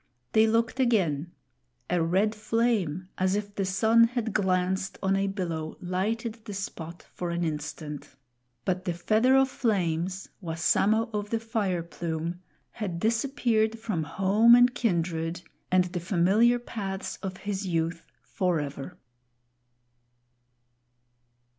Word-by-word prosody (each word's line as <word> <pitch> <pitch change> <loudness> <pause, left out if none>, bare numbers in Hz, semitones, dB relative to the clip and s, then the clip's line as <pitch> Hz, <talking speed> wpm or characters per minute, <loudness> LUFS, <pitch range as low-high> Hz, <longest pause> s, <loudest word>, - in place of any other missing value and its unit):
They 220 0 +5
looked 230 +3 +1
again; 175 - +1 0.6
a 175 -1 +1
red 190 +6 +2
flame, 210 -6 0
as 185 +1 +2
if 205 0 -3
the 195 -1 -1
sun 220 +5 +4
had 230 -2 -2
glanced 190 -1 0
on 195 0 +2
a 195 0 +1
billow, 170 -5 -3
lighted 215 +5 -2
the 205 - -6
spot 170 -3 -6
for 175 - -4
an 170 0 -1
instant; 150 -1 -5 0.5
but 185 0 -1
the 175 - 0
Feather 220 +9 +3
of 270 0 +5
Flames, 185 -6 -1
Wassamo 200 +7 +1
of 205 0 -3
the 230 - 0
Fire 210 -6 -1
Plume, 170 +1 -4 0.3
had 190 -7 -4
disappeared 225 0 +1
from 220 -7 -2
home 200 +8 +5
and 245 +1 +5
kindred 170 -5 -1 0.3
and 185 0 +5
the 180 0 -4
familiar 195 +7 +3
paths 200 -5 -5
of 190 -2 -6
his 200 -1 -4
youth, 165 -1 -1 0.2
forever. 150 -7 -2
190 Hz, 125 wpm, -27 LUFS, 170-220 Hz, 0.6 s, They